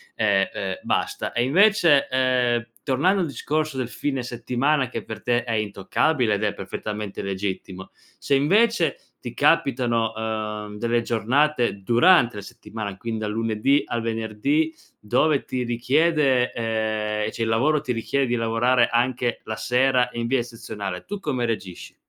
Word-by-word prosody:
ehm, 100 -3 +2
ehm, 95 -1 -3
basta. - - -2
E 120 - 0
invece, 170 -1 +4
ehm, 125 -2 +1 0.2
tornando 175 +8 +2
al 170 - 0
discorso 155 0 -2
del 125 -2 -2
fine 135 0 -3
settimana, 125 +4 0
che 115 -3 -5
per 110 -2 -8
te 120 -1 +1
è 120 - -5
intoccabile, 110 +4 0
ed 105 +1 -1
è 105 -1 0
perfettamente 105 +1 -5
legittimo: 95 -1 -5 0.3
se - - -2
invece 175 +4 +3 0.2
ti 120 -1 -7
capitano, 120 -6 +2
ehm, 105 -1 -4
delle 120 +1 0
giornate, 120 -1 +1
durante 120 - +4
la - - -5
settimana 100 -1 -7
quindi 115 +1 -4
dal 105 -1 -3
lunedì 115 +5 +1
al 120 - -3
venerdì, 115 +8 -1 0.3
dove 135 +7 +1
ti 130 -1 -3
richiede, 130 +2 +2
ehm, 110 -2 -2
cioè, 115 - -4
il - - -1
lavoro 140 +6 +2
ti 130 - -3
richiede 135 +4 0
di 120 -1 0
lavorare 115 +1 +2
anche 120 0 0
la 110 - -5
sera 125 0 +2
in 120 0 -3
via 130 +2 +1
eccezionale, 110 -6 -6
tu 205 - -5
come 130 -9 -2
reagisci? 100 -6 -5
120 Hz, 150 wpm, -23 LUFS, 110-135 Hz, 0.3 s, invece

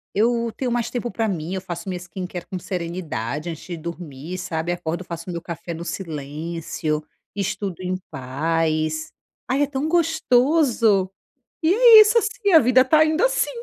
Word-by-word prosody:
eu 230 +1 +1
tenho 250 -2 -2
mais 240 -1 0
tempo 240 -1 -3
pra 225 -1 -1
mim, 175 -2 -3
eu 190 - -1
faço 175 0 -6
minha 180 -1 -3
skincare 180 0 -7
com 185 - -4
serenidade 170 - -4
antes 160 - -7
de 175 - -5
dormir, 165 0 -7
sabe? 175 -2 -3
Acordo, 175 0 -3
faço 170 0 -7
o - - -3
meu 170 - -4
café 170 0 -6
no 165 +1 -6
silêncio, 155 -1 -4 0.3
estudo 195 -2 -3
em 185 0 -2
paz, 155 +3 -1 0.4
ai, 275 +3 +2
é - - +1
tão 285 +2 -2
gostoso! 260 - +3 0.5
E 335 +4 +4
é 460 -1 +9
isso, 430 +2 +5
assim, 440 -2 +1
a 320 - +10
vida 255 +1 +5
está 310 +4 +5
indo 315 +7 +1
assim. - - +2
185 Hz, 170 wpm, -22 LUFS, 165-255 Hz, 0.5 s, a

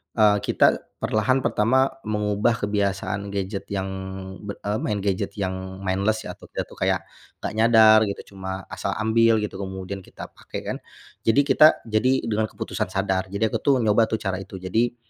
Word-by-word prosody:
eee, 105 -2 +5
kita - - +3 0.2
perlahan 130 +5 +1
pertama 130 +5 +2 0.2
mengubah 105 +1 0
kebiasaan 100 -1 -1
gadget 100 0 -4
yang 95 0 -2 0.6
be 100 - -4
eee, 105 +1 -3
main 105 -2 -1
gadget 100 0 -1
yang 95 -1 -4
mindless 100 +4 0
ya - - -6
atau - - -13
dia, - - -3
tuh, - - -16
kayak - - +1 0.4
gak - - -2
nyadar 110 -1 +7
gitu 100 - -6
cuma 95 0 -5
asal - - -3
ambil 115 +1 +3
gitu 100 -2 -5
kemudian 95 0 -5
kita 90 - -11
pake, - - -8
kan, - - -3 0.5
jadi 125 +5 +5
kita, 145 +2 +6 0.2
jadi 115 +4 +1
dengan 110 -1 0
keputusan 90 - -4
sadar. 95 0 -1
Jadi 100 +3 -3
aku, - - +1
tuh, 140 -2 +3
nyoba, 110 +1 +4
tuh, 110 - -1
cara 95 -1 -2
itu. 95 - -9
Jadi, 110 +7 0
105 Hz, 175 wpm, -24 LUFS, 95-110 Hz, 0.6 s, nyadar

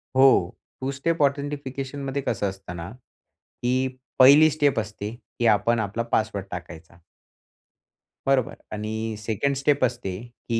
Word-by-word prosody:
हो, 130 +1 +7 0.6
to 130 +1 -1
step 165 +3 0
ऑथेंटिफिकेशनमध्ये 140 -1 -2
कसं 100 -2 0
असतं 95 -2 -9
ना, 85 +1 -6
की 125 +1 -4 0.3
पहिली 145 +4 +8
स्टेप 145 -5 +2
असते, 105 0 -5 0.3
की 120 - +3
आपण 115 +3 +1
आपला 110 +2 -2
पासवर्ड 110 -3 0
टाकायचा. 85 -1 -9 1.3
बरोबर. 135 -3 +2 0.2
आणि 110 +1 -3
सेकंड 110 +6 -1
स्टेप 140 0 +1
असते, 95 -6 -4 0.3
की 115 -1 +1
120 Hz, 125 wpm, -25 LUFS, 105-140 Hz, 1.3 s, पहिली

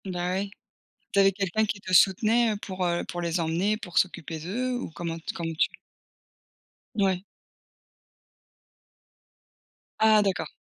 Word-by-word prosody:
Bah 180 -1 -2
oui. 195 +2 -2 0.6
Tu - - +1
avais 195 0 +6
quelqu'un 195 +2 0
qui 210 -1 -3
te 185 - -6
soutenait, 220 +6 +5
heu, - - -2
pour 185 -3 -4
heu, 175 -1 0
pour 175 - -5
les 170 +1 0
emmener, 175 +6 0
pour 180 -5 -9
s'occuper 165 -3 0
d'eux 230 +11 -2
ou 245 - -5
comment 165 0 -5
tu 165 - -5
comment 165 -1 -4
tu? 155 - +2 1.3
ouais. 190 -3 +1 2.8
Ah 220 -1 +6
d'accord. 195 -2 -1
190 Hz, 140 wpm, -27 LUFS, 175-210 Hz, 2.8 s, avais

